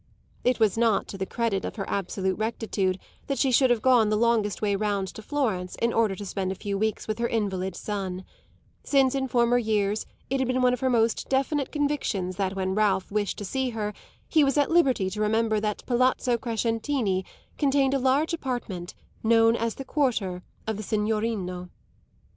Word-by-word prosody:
It 250 0 +2
was 220 -1 +2
not 230 -3 +2
to 195 - -6
the 190 - -2
credit 225 -5 -1
of - - -5
her 195 -3 -4
absolute 190 0 -2
rectitude 215 -4 -1 0.3
that 275 - -1
she 270 - +2
should 260 +1 +5
have 240 -3 +2
gone 245 -5 +5
the 215 - +2
longest 225 -3 +2
way 205 -2 +1
round 200 -1 -1
to - - -9
Florence 215 -10 -2
in 235 0 +1
order 220 -4 +2
to 205 - -7
spend 190 -1 -2
a - - -3
few 200 +1 -4
weeks 215 +2 -1
with 215 +1 -2
her 235 - +1
invalid 190 -5 -2
son; 190 -3 -4 0.6
since 270 -2 +3
in 270 -1 -1
former 240 -1 +3
years 215 -2 0 0.2
it 270 +1 -1
had 260 - +1
been 255 0 +1
one 250 0 +4
of 250 - -2
her 260 - +1
most 230 -2 +1
definite 275 +1 0
convictions 280 - -1
that 195 -1 -1
when 190 -1 -1
Ralph 195 -2 +1
wished 205 -1 -1
to 205 - -5
see 260 +5 -1
her 210 -1 -2 0.3
he 310 -2 +4
was 275 0 +2
at 290 +1 +2
liberty 265 - +3
to 210 - -4
remember 220 0 +2
that 210 -1 -3
Palazzo 250 0 +2
Crescentini 230 -3 -1 0.4
contained 275 -2 +3
a 275 - +2
large 270 +6 +2
apartment 240 - -4 0.3
known 225 0 +4
as 230 -1 -1
the 270 - -7
quarter 225 -11 0 0.2
of 220 -2 -2
the - - -4
signorino. 210 -4 -1
220 Hz, 195 wpm, -26 LUFS, 200-255 Hz, 0.6 s, should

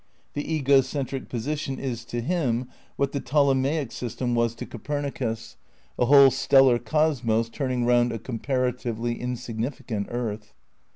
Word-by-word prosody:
The 145 +2 -4
ego 140 -3 +4
centrio 135 0 -3
position 135 +3 -3
is 120 -4 -4
to 120 0 -3
him 130 -5 0 0.3
what 140 0 0
the 140 - -2
Ptolemaic 140 -1 +1
system 120 0 -3
was 115 -1 +1
to - - -6
Copernicus, 120 -4 -4 0.4
a 125 - +4
whole 140 0 +8
stellar 135 -2 +5
cosmos 120 -6 +1
turning 130 -1 -1
round 120 0 +3
a 115 - -3
comparatively 120 -1 -2
insignificant 120 -3 -4
earth. 110 -3 -4
125 Hz, 130 wpm, -25 LUFS, 115-140 Hz, 0.4 s, whole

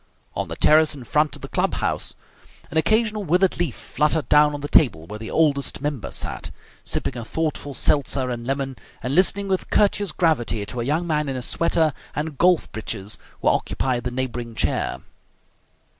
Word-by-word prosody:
On - - -2
the - - -5
terrace 155 0 +4
in 135 - -9
front 150 +4 +1
of - - -14
the - - -5
club - - 0
house - - -2 0.6
an 160 - -2
occasional 215 +4 +2
withered 180 +2 +2
leaf 165 -9 0
fluttered 150 0 0
down 150 0 +5
on 145 - -6
the 145 - -4
table 120 - +3
where 105 +5 -8
the 110 - -7
Oldest 145 -4 +2
Member 145 -5 -3
sat, - - -2 0.3
sipping 130 - 0
a 120 - -5
thoughtful 150 +1 -3
seltzer 135 -2 +1
and 120 -1 -5
lemon 135 -1 -2 0.3
and 125 +3 -2
listening 195 +4 +5
with 190 -1 -1
courteous 205 -1 +2
gravity 120 - 0
to 120 +3 -4
a - - -3
young 155 +6 0
man 150 -3 0
in 135 - -3
a 130 - -3
sweater 160 +1 +2 0.2
and 150 -2 -4
golf 180 -2 +3
breeches 105 -2 -4 0.2
who - - +4
occupied 125 -3 -1
the 125 - -2
neighbouring 120 -2 -4
chair. - - -1
145 Hz, 185 wpm, -23 LUFS, 125-160 Hz, 0.6 s, down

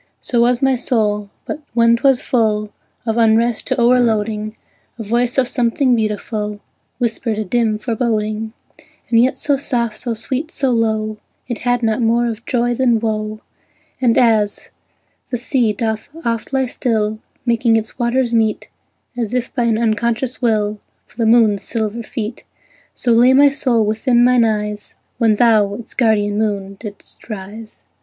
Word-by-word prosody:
So 240 -2 +1
was 245 +2 +2
my 270 0 +4
soul; 210 -5 0 0.2
but 305 - -5
when 230 0 +5
'twas 265 +1 +2
full 215 -3 0 0.3
Of 225 -1 -1
unrest 230 0 +2
to 260 -1 0
o'erloading, 225 -3 +1 0.4
A 225 - -5
voice 240 +4 0
of 260 -2 +3
something 245 +1 +1
beautiful 210 -1 -3 0.4
Whispered 230 -2 -2
a 215 - -2
dim 225 +1 +1
foreboding, 220 -1 -2 0.6
And 230 - +5
yet 250 +3 +3
so 285 -2 +1
soft, 235 -5 -2
so 240 -2 -3
sweet, 260 +7 -3
so 270 -5 -1
low, 220 -2 0 0.3
It 240 -2 -4
had 245 -1 0
not 220 +1 +1
more 235 +1 +2
of 230 -1 -5
joy 240 -1 +1
than 240 -2 +2
woe; 215 -1 -3 0.6
And, 240 -3 +3
as 220 -4 +2 0.6
the 245 - -2
sea 240 -2 +1
doth 220 +1 -3 0.2
oft 230 +1 -2
lie 265 -1 +1
still, 220 -3 -1 0.3
Making 235 -1 +2
its 220 +2 -3
waters 240 0 +1
meet, 220 -2 0 0.5
As 240 -1 -3
if 250 0 -2
by 245 -3 0
an 225 -2 +2
unconscious 235 +3 -1
will, 215 -3 0 0.3
For - - -25
the 230 -2 +1
moon's 220 -3 +4
silver 220 +1 -3
feet, 230 0 -6 0.5
So 245 - 0
lay 240 +3 +5
my 280 +1 +6
soul 245 -6 +1
within 235 +3 +2
mine 245 -1 +4
eyes 210 -1 -3 0.2
When 225 -3 +3
thou, 210 -3 +3
its 235 - -8
guardian 210 -4 +1
moon, 200 -2 -2
didst 210 +1 -11
rise. 215 +2 -9
230 Hz, 160 wpm, -18 LUFS, 215-245 Hz, 0.6 s, my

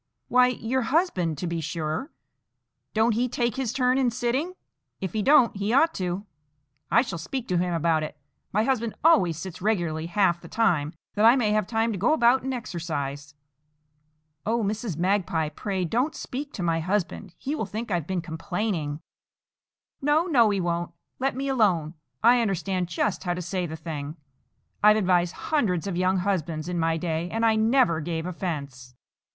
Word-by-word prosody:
"Why, 250 0 +5
your 250 +1 -1
husband, 230 - +1
to 180 - -4
be 170 -1 -2
sure; 160 - -3 0.8
don't 220 +1 +3
he 245 +3 0
take 235 -1 -1
his 265 -4 -1
turn 255 +1 +2
in 255 -2 +3
sitting? 255 +9 -1 0.4
If 190 -3 -4
he 215 - 0
don't, 265 -1 +5
he 200 +2 -1
ought 320 +5 +4
to. 185 +2 -3 0.6
I 235 - +5
shall 190 -10 -5
speak 245 +9 -4
to 180 -1 +2
him 180 0 0
about 165 -1 +2
it. 155 0 -5 0.3
My 210 +2 +2
husband 235 -3 0
always 185 - +4
sits 180 +1 -7
regularly 170 -6 0
half 175 -1 +2
the - - -11
time, 165 -9 +1 0.2
that 210 - 0
I 230 +3 +8
may 230 -5 +1
have 210 -2 +1
time 225 0 0
to 200 - -4
go 240 +11 +3
about 250 -3 +4
and 265 - -3
exercise." 145 - -4 1.1
"O 230 +1 0
Mrs. 210 -4 -2
Magpie, 175 -4 +1
pray 190 +4 -3
don't 250 - 0
speak 280 +3 -5
to 185 - -4
my 165 -1 +1
husband; 185 +1 -2
he 280 - -3
will 255 -10 -2
think 220 +3 -5
I've 170 -4 -1
been 185 -3 -2
complaining." 165 -2 -3 1.0
"No, 295 +4 +3
no, 245 -11 +4
he 200 -1 0
won't. 175 -1 -2 0.3
Let 270 -1 0
me 275 +1 -3
alone. 190 - +2 0.3
I 240 +1 +6
understand 190 -3 -1
just 185 +3 -1
how 175 -2 -1
to 180 - -4
say 180 0 -2
the 160 - -6
thing. 155 -1 -6 0.6
I've 210 +1 +6
advised 180 -3 +2 0.2
hundreds 200 - +1
of 195 -3 -3
young 185 +1 +2
husbands 170 -4 -1
in 180 -1 -2
my 165 0 +1
day, 165 0 -2
and 225 +3 0
I 220 -1 +4
never 220 -6 +3
gave 160 +1 -3
offence." 140 -9 -5
190 Hz, 180 wpm, -26 LUFS, 170-235 Hz, 1.1 s, I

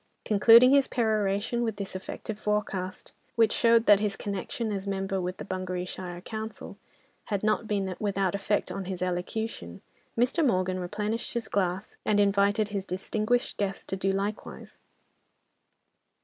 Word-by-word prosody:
Concluding 230 +4 +7
his 280 -1 +5
peroration 215 0 0
with 225 -3 -1
this 200 -2 -6
effective 205 +3 -6
forecast, 205 -3 -2 0.2
which 225 -2 +4
showed 230 -1 +4
that 205 -1 +7
his 205 -2 -1
connection, 205 +3 -3
as 200 -1 -4
member, 195 -1 -1
with 180 +1 -3
the - - -7
Bungareeshire 185 -1 -4
council 220 +2 -7 0.5
had 205 -2 -2
not 215 +1 +1
been 195 -3 -1
without 195 -3 0
effect 200 +1 -1
on 195 - -4
his 185 -1 -3
elocution, 180 - -3 0.4
Mr. 250 +8 +2
Morgan 185 -7 +1
replenished 210 +6 -3
his 235 -2 -2
glass, 190 0 -2
and 205 -1 +2
invited 205 +1 +3
his 200 -2 -3
distinguished 215 +6 -1
guests 195 -1 -2
to - - -3
do 195 0 0
likewise. 200 +2 -4
200 Hz, 145 wpm, -28 LUFS, 190-220 Hz, 0.5 s, Concluding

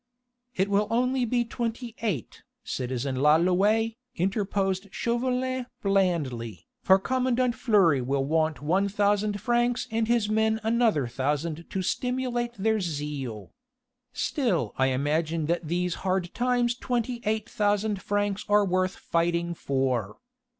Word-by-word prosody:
"It 190 -1 +1
will 200 +1 +2
only 250 +2 +1
be 240 +1 +1
twenty 235 0 -4
eight, 190 - -3 0.2
citizen 130 +1 -3
Lalouët," 185 - +3 0.2
interposed 195 +1 -1
Chauvelin 250 +3 -1 0.2
blandly, 140 - 0 0.2
"for 190 0 +6
commandant 255 +3 +1
Fleury 190 - +3
will 135 +2 0
want 155 -1 0
one 190 +6 +2
thousand 205 +1 +1
francs 240 +2 +1
and 225 0 0
his 235 -2 +2
men 220 +1 +1
another 225 - +2
thousand 150 +6 -2
to 190 - -2
stimulate 245 +2 -1
their 220 +2 +1
zeal. 145 - -4 0.6
Still! 195 - -1
I 130 - +2
imagine 155 +4 0
that 170 0 -1
these 175 +1 0
hard 185 -2 -1
times 245 -1 +1
twenty 245 -1 -2
eight 215 0 -1
thousand 205 -1 0
francs 205 0 -1
are 205 0 +5
worth 185 0 0
fighting 170 0 0
for." 130 -9 -1
195 Hz, 125 wpm, -27 LUFS, 155-230 Hz, 0.6 s, for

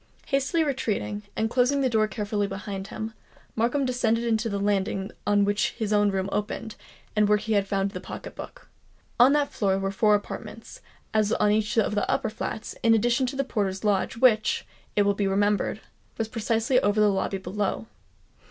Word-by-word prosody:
Hastily 275 +4 +1
retreating, 230 -7 -2
and 220 - +1
closing 255 +4 +2
the 265 - +3
door 220 -2 +2
carefully 205 0 -2
behind 195 0 -5
him, 220 +1 -6 0.4
Markham 245 +5 +1
descended 235 -2 +1
to 230 0 -2
the 200 - -2
landing 195 0 -1 0.2
on 205 -1 +4
which 205 +3 0
his 215 -2 -2
own 205 0 +4
room 190 -1 -1
opened, 210 +1 -3 0.4
and 210 -1 +3
where 210 - +5
he 220 +1 -2
had 200 -1 +2
found 195 0 0
the - - -6
pocket - - -8
book. - - -10 0.5
On 250 +3 +7
that 295 -1 +1
floor 195 -2 +1
were 195 0 -1
four 210 +1 +4
apartments, 205 - -7 0.3
as 215 -1 +2
on 210 0 +3
each 210 +1 0
of 215 -1 +2
the 205 - 0
upper - - 0
flats, 220 0 -5
in 225 0 +5
addition 240 +4 +2
to 265 - -4
the 275 - 0
porter's 200 -6 -2
lodge, 205 +1 +1
which, 225 -3 +3 0.3
it 205 - +4
will 200 0 +3
be 200 0 0
remembered, 205 +1 +1 0.4
was 225 - -1
precisely 225 +3 +1
over 205 +1 +1
the 210 - +5
lobby 195 0 0
below. 190 +3 -3
210 Hz, 190 wpm, -26 LUFS, 200-230 Hz, 0.5 s, On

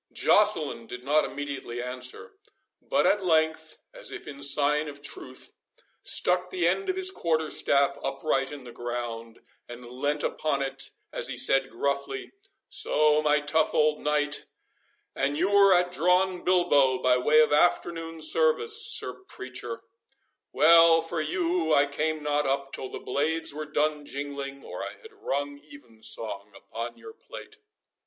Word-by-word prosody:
Joceline 160 - +2
did 125 +1 -8
not 150 +3 +2
immediately 140 -4 -6
answer, 125 +1 -5 0.5
but - - +1
at 205 - +2
length, 160 -2 +1 0.2
as - - -5
if - - -8
in 140 -1 -9
sign 145 +2 +2
of 145 -1 -10
truce, 130 -2 -7 0.5
stuck 180 0 +2
the 180 -2 0
end 190 +2 0
of 375 - 0
his 375 0 +1
quarterstaff 155 - 0
upright 135 -3 -1
in 145 -2 -9
the 120 - -10
ground, 120 -1 -6 0.3
and 120 +1 -9
leant 145 +4 -2
upon 140 -3 -1
it 135 -1 -2 0.2
as - - +2
he - - -4
said 135 -1 +2
gruffly,—"So, 150 - -1
my 150 -1 +2
tough 155 +1 +1
old 150 0 +3
knight 150 0 0 0.7
and 140 +2 -1
you 185 +5 +1
were 200 -1 +6
at 180 -1 +3
drawn 180 +1 +1
bilbo, 145 -8 +3
by 125 0 +3
way 150 +5 +4
of 155 -1 +4
afternoon 165 0 +1
service, 460 -2 +2
sir 450 - 0
preacher—Well 165 - +1
for 165 0 -3
you 165 0 0
I 140 - +5
came 155 +2 -2
not 150 0 0
up 135 0 -2
till 130 - -5
the - - -6
blades 160 +4 -2
were 155 +1 -5
done 150 -1 -1
jingling, 140 0 -6
or - - -7
I - - -6
had 445 0 -13
rung 145 - -4
even 140 -6 -16
song 105 -2 -4
upon 115 +4 -7
your 445 - -12
pate." 430 -1 -12
150 Hz, 150 wpm, -27 LUFS, 135-170 Hz, 0.7 s, were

